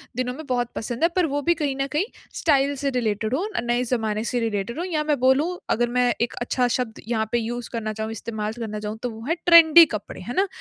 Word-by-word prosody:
दिनों 250 0 -2
में 310 +2 -9
बहुत 245 -2 0
पसंद 235 +5 -4
है 335 - +5
पर 365 -2 +3
वो 290 - -1
भी 340 +4 +3
कहीं 280 -2 0
न 275 - 0
कहीं 335 +7 +1 0.3
स्टाइल 285 -2 +2
से 275 +1 -1
रिलेटेड 220 -3 -1
हों, 365 +8 -1 0.2
नए 240 +1 +1
ज़माने 220 -3 -1
से 245 +1 -1
रिलेटेड 225 +1 -2
हों 355 - -2
या 315 -4 -1
मैं 295 -3 0
बोलूँ 285 +8 +2
अगर 240 +1 +1
मैं 245 0 +2
एक 235 - 0
अच्छा 245 +1 +1
शब्द 225 -3 -4
यहाँ 220 -2 0
पे 240 - +2
यूज़ 240 +1 -4
करना 215 -2 -3
चाहूँ 220 +1 -4
इस्तेमाल 220 -1 -4
करना 215 -2 -4
चाहूँ 210 +1 -5
तो 245 - -1
वो 225 0 -9
है 330 - +1
ट्रेंडी 335 -1 +9
कपड़े, 205 - -7
है 240 +6 -6
ना? 390 +1 +2
245 Hz, 245 wpm, -23 LUFS, 225-285 Hz, 0.3 s, ट्रेंडी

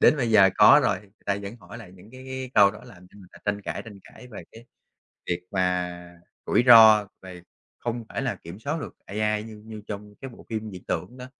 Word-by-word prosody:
Đến 155 - +5
bây 120 -4 -1
giờ 100 -3 +6
có 135 +8 +7
rồi, 100 -6 +1 0.3
ta 100 0 0
vẫn 100 +4 -8
hỏi 120 - -12
lại 100 -6 -13
những 95 +4 -17
cái 130 0 -13
cái 130 -1 -6
câu 100 - +6
đó 105 - -12
làm 90 -2 -16
cho 105 - -18
người 95 -3 -16
ta - - -15
tranh 105 0 -1
cãi - - -5
tranh 105 -3 -12
cãi 125 - -15
về 95 -6 -10
cái 115 +1 -14 0.6
việc 90 0 -2
mà 90 -2 -3 0.3
rủi 120 - +2
ro, 110 -3 +8 0.2
về 90 -2 -11 0.4
không 120 -1 -4
phải - - -4
là - - -2
kiểm 85 +4 -11
soát 145 +7 -4
được - - -9
AI 105 +1 -1
như 110 -1 -11
như 110 -1 -9
trong 105 0 -8
cái 135 - -8
bộ 120 - -15
phim 110 -1 -4
viễn 90 -2 -11
tưởng 90 +9 -4
đó, 125 - -8
105 Hz, 235 wpm, -25 LUFS, 95-115 Hz, 0.6 s, ro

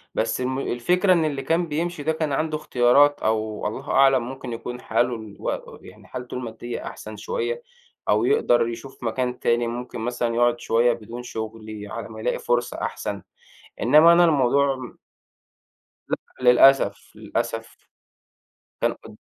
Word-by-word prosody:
بس - - 0
الم 130 +1 -1
الفكرة 180 - +2
إن 165 -2 +2
اللي 140 -3 -2
كان 165 +3 0
بيمشي 160 +1 -3
ده 160 - +1
كان 155 -2 -2
عنده 155 +2 0
اختيارات 140 +2 +4
أو 110 -1 -1
الله 135 +6 -5
أعلم 135 -2 +5
ممكن 130 -2 -6
يكون 125 +2 -6
حاله 120 +2 +1
الو 110 -2 -10 0.2
و - - -11
يعني - - -15
حالته 125 -1 -7
المادّية 120 0 -6
أحسن - - -8
شوية 475 0 -3 0.5
أو - - +3
يقدر 120 - +3
يشوف 125 +2 -8
مكان 125 +2 -2
تاني، 120 0 +1
ممكن 120 0 -5
مثلًا 120 0 -1
يقعُد 120 0 +2
شوية 120 +1 +2
بدون 120 +2 -8
شُغل 110 -2 -7
على 115 -1 -6
ما 110 - -9
يلاقي 125 +3 -1
فرصة 120 0 -1
أحسن. - - -4 0.6
إنّما 155 +7 +7
أنا 175 0 +6
الموضوع 140 -2 +3
م 130 -3 -9 1.1
لأ 125 -1 0
للأسف، 135 +2 +4
للأسف. - - -4 1.0
كان - - +2
قد - - -14
125 Hz, 150 wpm, -24 LUFS, 115-145 Hz, 1.1 s, إنّما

